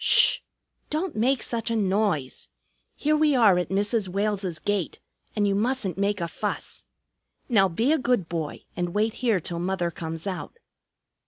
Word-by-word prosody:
"Sh! - - +6 0.5
Don't 315 +3 -2
make 250 +4 +2
such 230 -2 -2
a 230 - 0
noise. 195 -9 0 0.5
Here 305 +1 +1
we 305 -2 +3
are 210 -7 +5
at 175 - -2
Mrs. 205 +2 +1
Wales's 195 -2 -1
gate, 195 +1 -2 0.4
and 205 -2 +2
you 200 - +2
mustn't 215 -3 0
make 200 +2 0
a 170 - -1
fuss. - - -4 0.6
Now 200 -6 +4
be 230 - +2
a 320 - +2
good 245 -9 +1
boy 160 -3 -4
and 175 0 -3
wait 215 +1 +2
here 230 -6 +3
till 170 +1 -4
Mother 175 -1 -1
comes 160 +1 -6
out." 190 - -5
200 Hz, 165 wpm, -26 LUFS, 175-230 Hz, 0.6 s, Sh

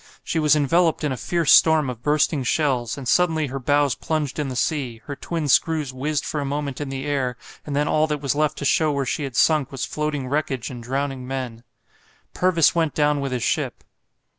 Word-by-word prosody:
She 165 - -1
was 150 -1 +4
enveloped 165 +3 +2
in 150 - 0
a - - -1
fierce 170 +4 0
storm 160 -3 +6
of 120 -2 -6
bursting 150 0 +1
shells, 125 -3 0
and 135 -3 -7
suddenly 160 0 +2
her 135 0 -5
bows 145 0 +2
plunged 155 0 -3
in 150 - -1
the 130 - -5
sea, 125 -4 -1
her 145 - -5
twin 165 +1 -3
screws 150 -1 +2
whizzed 145 +3 -2
for 150 - -2
a - - -2
moment 140 0 -3
in 145 - -4
the 135 +1 -5
air, 130 -4 -1 0.3
and 145 - -3
then 145 +1 +1
all 155 0 +2
that 150 -1 -2
was 140 -2 -1
left 150 0 0
to 140 - -4
show 155 +2 +3
where 140 -1 -1
she 145 +3 -2
had 135 -3 -7
sunk 155 -4 +3
was 135 - -3
floating 150 -3 -3
wreckage 135 -3 -2
and 120 -2 -8
drowning 135 +1 -3
men. 125 -3 -5 0.7
Purvis 175 -4 +3
went 165 -3 0
down 150 -1 +2
with 135 -1 -3
his 125 -3 -2
ship. - - -1
145 Hz, 215 wpm, -23 LUFS, 130-155 Hz, 0.7 s, storm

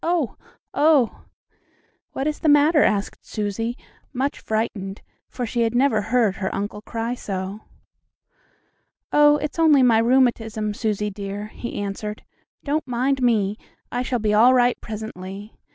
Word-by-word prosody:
Oh! 335 -6 0 0.4
oh!" 290 -5 +3 0.9
"What 270 - -3
is 305 0 -1
the 315 - +1
matter?" 295 +2 +5
asked 205 -1 0
Susie, 225 +3 -3 0.3
much 275 +2 -2
frightened, 215 -3 -3 0.3
for 250 - -4
she 235 +1 -2
had 230 0 +1
never 245 -4 +3
heard 225 -3 +1
her 190 - -2
uncle 205 +1 -4
cry 230 +2 -3
so. 195 -3 -5 1.5
"Oh, 295 0 +6
it's 300 +2 -5
only 300 -5 +5
my 230 -3 +5
rheumatism, 225 -3 +1
Susie 210 -1 -2
dear," 200 +1 -6
he 235 - -7
answered. 205 +1 -4 0.4
"Don't 300 0 -1
mind 255 +2 0
me. 215 -4 +1 0.3
I 245 - -1
shall 250 0 -1
be 210 -2 0
all 240 +5 +6
right 245 -1 +2
presently. 205 -1 -7
230 Hz, 140 wpm, -23 LUFS, 210-260 Hz, 1.5 s, Oh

